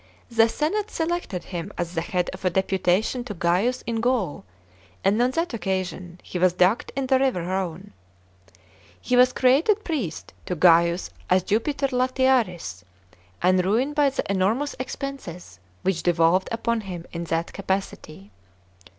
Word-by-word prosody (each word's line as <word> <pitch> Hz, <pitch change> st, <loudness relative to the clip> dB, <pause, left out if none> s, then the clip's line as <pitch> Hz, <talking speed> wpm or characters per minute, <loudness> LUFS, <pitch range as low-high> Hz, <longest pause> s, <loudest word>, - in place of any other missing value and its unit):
The 225 Hz, 0 st, +4 dB
senate 400 Hz, -, -1 dB
selected 325 Hz, -, -2 dB
him 175 Hz, -3 st, -6 dB
as 175 Hz, 0 st, -3 dB
the 165 Hz, -, -1 dB
head 180 Hz, +1 st, -1 dB
of 190 Hz, -, -10 dB
a 185 Hz, -, +3 dB
deputation 190 Hz, +5 st, +1 dB
to 210 Hz, -5 st, -6 dB
Gaius 185 Hz, +10 st, +1 dB
in 230 Hz, -1 st, -2 dB
Gaul, 230 Hz, -, 0 dB, 0.6 s
and 205 Hz, +4 st, +3 dB
on 245 Hz, -, +3 dB
that 330 Hz, +3 st, -2 dB
occasion 185 Hz, -4 st, -3 dB
he 180 Hz, -, -5 dB
was 180 Hz, 0 st, +4 dB
ducked 180 Hz, +5 st, +2 dB
in 275 Hz, -1 st, -1 dB
the 260 Hz, 0 st, +3 dB
river 260 Hz, -10 st, +1 dB
Rhone. 185 Hz, +1 st, -4 dB, 1.1 s
He 250 Hz, -, 0 dB
was 250 Hz, +1 st, +6 dB
created 305 Hz, +14 st, +3 dB
priest 255 Hz, -, -4 dB
to 180 Hz, -, -1 dB
Gaius 170 Hz, +1 st, +4 dB, 0.2 s
as 185 Hz, 0 st, +4 dB
Jupiter 275 Hz, +8 st, 0 dB
Latiaris, 250 Hz, -, +1 dB, 0.6 s
and 185 Hz, 0 st, +4 dB
ruined 235 Hz, +10 st, +1 dB
by 290 Hz, -1 st, +3 dB
the 270 Hz, -, -2 dB
enormous 205 Hz, +9 st, 0 dB
expenses 255 Hz, -, -6 dB, 0.2 s
which 185 Hz, -3 st, 0 dB
devolved 175 Hz, +2 st, +2 dB
upon 230 Hz, 0 st, -1 dB
him 180 Hz, -4 st, -7 dB
in 170 Hz, 0 st, -4 dB
that 165 Hz, +1 st, -2 dB
capacity. 190 Hz, -, -4 dB
195 Hz, 150 wpm, -24 LUFS, 180-255 Hz, 1.1 s, was